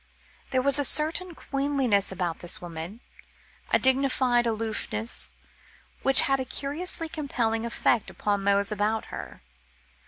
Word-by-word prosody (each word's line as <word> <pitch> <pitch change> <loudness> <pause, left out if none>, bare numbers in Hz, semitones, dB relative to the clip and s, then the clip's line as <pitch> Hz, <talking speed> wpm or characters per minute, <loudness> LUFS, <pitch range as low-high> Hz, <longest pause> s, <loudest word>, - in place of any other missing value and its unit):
There 255 -1 0
was 280 +1 +5
a - - +3
certain 325 +5 +1
queenliness 275 -10 0
about 175 -3 -3
this 175 - +2
woman, 175 +6 -8 0.7
a - - +4
dignified 260 -2 +2
aloofness, 220 0 -1 0.7
which 270 -1 +7
had 270 0 +1
a - - -1
curiously 315 +6 -3
compelling 235 -8 -2
effect 230 -1 0
upon 205 -1 -2
those 200 +1 +2
about 210 +2 -1
her. - - -8
240 Hz, 125 wpm, -26 LUFS, 205-275 Hz, 0.7 s, which